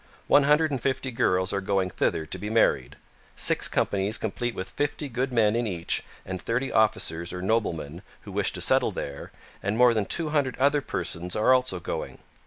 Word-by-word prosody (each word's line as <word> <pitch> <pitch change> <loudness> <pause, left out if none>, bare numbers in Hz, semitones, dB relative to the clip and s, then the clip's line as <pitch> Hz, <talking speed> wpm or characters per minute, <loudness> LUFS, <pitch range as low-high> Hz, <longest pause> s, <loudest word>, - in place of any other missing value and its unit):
One 145 -1 +5
hundred 150 +2 +3
and 135 -4 -2
fifty 130 0 -1
girls 95 -6 +1
are 100 - -1
going 95 -1 0
thither 80 - -1
to - - -4
be 105 - -5
married; 110 - +2 0.4
six - - +3
companies 100 +2 0
complete 120 +2 -3
with 95 0 -6
fifty 145 +3 -2
good 130 +1 -2
men 110 -3 +3
in 120 0 0
each 85 -4 0 0.2
and 95 -1 -5
thirty 125 +4 -1
officers 90 -6 +1
or 90 - -5
noblemen, 85 -7 -1 0.2
who - - -11
wish - - +1
to - - -4
settle - - +4
there, 70 -1 -6 0.3
and 100 +3 -2
more 125 -1 +6
than 110 -3 0
two 165 -3 +1
hundred 145 -4 0
other 140 +2 +3
persons 90 -5 -4
are 110 +4 +4
also 125 -8 +1
going. - - -5
110 Hz, 190 wpm, -26 LUFS, 95-130 Hz, 0.4 s, more